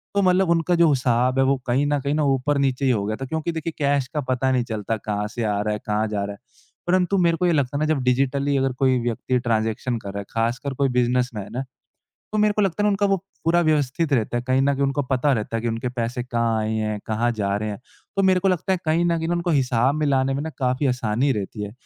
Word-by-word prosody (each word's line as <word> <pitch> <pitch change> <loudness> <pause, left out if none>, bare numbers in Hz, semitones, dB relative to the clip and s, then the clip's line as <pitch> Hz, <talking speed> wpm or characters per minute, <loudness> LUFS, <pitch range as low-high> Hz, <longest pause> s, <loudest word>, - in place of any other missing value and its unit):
तो 200 - +3
मतलब 185 -1 +3
उनका 170 +1 +2
जो 170 -1 +5
हिसाब 130 -1 +2
है, 135 - +4
वो 135 +1 +2
कहीं 130 +4 +2
न 145 -1 +1
कहीं 140 +1 -1
ना 150 0 +1
ऊपर-नीचे 140 0 +1
ही 130 - +4
हो 105 -5 0
गया 110 +1 -2
था। - - -2
क्योंकि 160 +4 -2
देखिए 165 0 -4
कैश 140 -2 +1
का 150 - 0
पता 130 +1 +1
नहीं 125 -2 +2
चलता 110 -1 -3
कहाँ 105 0 -3
से 120 - -2
आ 105 -2 0
रहा 105 0 -1
है, 105 - -4
कहाँ 105 +1 0
जा 105 -1 -2
रहा 100 - -5
है। - - -14 0.5
परंतु 185 +2 +2
मेरे 170 -2 +3
को 180 - 0
ये 175 - +3
लगता 140 -2 0
है - - -2
ना 155 - +1
जब 140 - -2
डिजिटली 135 +2 +1
अगर 135 -1 +1
कोई 130 -2 +3
व्यक्ति 120 +2 -1
ट्रांज़ैक्शन 115 +1 -1
कर 100 - -8
रहा 100 - -4
है, 100 - -6
ख़ासकर 120 +4 -1
कोई 135 +1 +1
बिज़नेसमैन 125 -4 0
है, 130 - -1 0.7
तो 215 - 0
मेरे 210 0 +3
को 210 - +1
लगता 195 0 0
है - - +1
ना - - +4
उनका 200 0 +1
वो 195 0 +2 0.3
पूरा 170 +1 +3
व्यवस्थित 150 0 +1
रहता 120 -1 +1
है। 120 - -1
कहीं 130 +1 +2
न 140 +1 +3
कहीं 140 - -1
उनको 140 +1 0
पता 130 +2 +1
रहता 115 -2 -2
है 115 - -3
कि 120 - -1
उनके 115 +2 -2
पैसे 120 0 -3
कहाँ 115 -2 0
आए 110 +1 -1
हैं, 110 -1 -1
कहाँ 115 +2 0
जा 100 -3 -1
रहे 110 +1 -3
हैं। 105 - -6 0.4
तो 195 - +2
मेरे 185 -1 +4
को 195 - +2
लगता 185 +1 0
है 185 - +1
कहीं 160 +2 +2
न 170 -1 +2
कहीं 165 0 -3
ना 175 - +1
उनको 175 0 -1
हिसाब 130 -3 +2
मिलाने 135 -3 +1
में 140 - -2
ना 160 - -4
काफ़ी 130 +2 0
आसानी 125 +1 +1
रहती 105 -1 -4
है। 105 0 -5
130 Hz, 270 wpm, -23 LUFS, 115-155 Hz, 0.7 s, जो